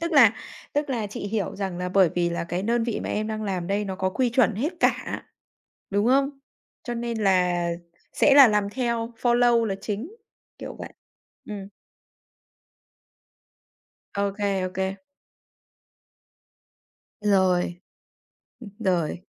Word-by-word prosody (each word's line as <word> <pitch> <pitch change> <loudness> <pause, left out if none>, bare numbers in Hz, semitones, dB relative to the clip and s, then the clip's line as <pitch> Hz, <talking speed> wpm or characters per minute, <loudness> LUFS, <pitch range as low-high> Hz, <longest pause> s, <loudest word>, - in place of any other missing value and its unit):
Tức 335 0 -2
là 245 -8 +7 0.4
tức 290 0 -1
là 230 -5 -1
chị 200 - -6
hiểu 205 -1 -2
rằng 190 -3 -3
là 180 0 -2
bởi 185 -1 +4
vì 175 -1 +1
là 170 - -2
cái 175 +2 -3
đơn 235 +2 +1
vị 235 -2 -2
mà - - -4
em 215 +1 -1
đang 215 0 -3
làm 185 -4 -2
đây 200 +2 0
nó 190 -2 -4
có 185 0 0
quy 245 +4 0
chuẩn 230 -3 +3
hết 285 - -1
cả, - - 0 0.7
đúng 205 +3 +1
không? 275 +2 +3 0.5
Cho 240 -4 -3
nên 235 -1 -3
là 180 -3 +2 0.4
sẽ 280 - +4
là 275 -4 +10
làm 210 -1 +1
theo 235 -1 -2
follow 240 -1 +4
là 200 -3 -1
chính, 230 - -5 0.4
kiểu - - -7
vậy. - - -8 0.6
Ừm. 200 -2 -6 2.5
Ô 200 - +1
kê, 200 -2 0
ô - - -5
kê. 190 +1 -2 2.2
Rồi. 185 -3 +2 0.8
Ừ, 235 - -10
rồi. 180 -5 0
205 Hz, 145 wpm, -25 LUFS, 190-235 Hz, 2.5 s, là